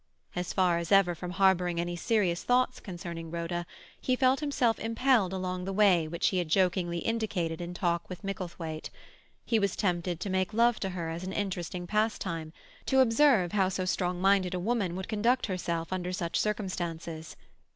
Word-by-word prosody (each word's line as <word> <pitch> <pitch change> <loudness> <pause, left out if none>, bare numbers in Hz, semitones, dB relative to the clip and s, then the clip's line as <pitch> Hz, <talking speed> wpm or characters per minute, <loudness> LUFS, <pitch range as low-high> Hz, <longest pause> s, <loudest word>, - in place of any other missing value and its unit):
As 180 0 -2
far 180 -3 +2
as 170 -1 -5
ever 195 -3 +5
from 175 +1 -6
harbouring 180 -2 +2
any 175 0 -2
serious 180 -2 +1
thoughts 250 +1 +2
concerning 170 -3 -7
Rhoda, 170 +1 -3 0.3
he 255 - +1
felt 260 +1 +3
himself 265 -6 +1
impelled 230 -3 +2
along 185 -1 -3
the 195 - -3
way 190 -5 +4
which 170 +2 0
he 185 - 0
had 175 - -1
jokingly 180 -1 +2
indicated 180 -6 -2
in 175 +1 -5
talk 170 -2 -1
with 180 +2 -8
Micklethwaite; 175 -5 -5 0.6
he 225 - +2
was 200 -2 0
tempted 175 -3 -1
to 200 - -4
make 185 +2 0
love 235 0 +4
to 195 - -2
her 175 -3 -4
as 170 +2 -5
an 190 +1 -4
interesting 180 -3 -3
pastime, 175 -6 -1 0.4
to 265 - +3
observe 235 - +4
how 195 -3 +2
so 185 0 -2
strong 180 -1 -1
minded 190 -1 +3
a - - -1
woman 200 -3 0
would 190 0 -5
conduct 235 +4 +1
herself 170 -3 -3
under 180 -1 -2
such 170 -2 -3
circumstances. 170 -6 -3
185 Hz, 180 wpm, -29 LUFS, 175-210 Hz, 0.6 s, ever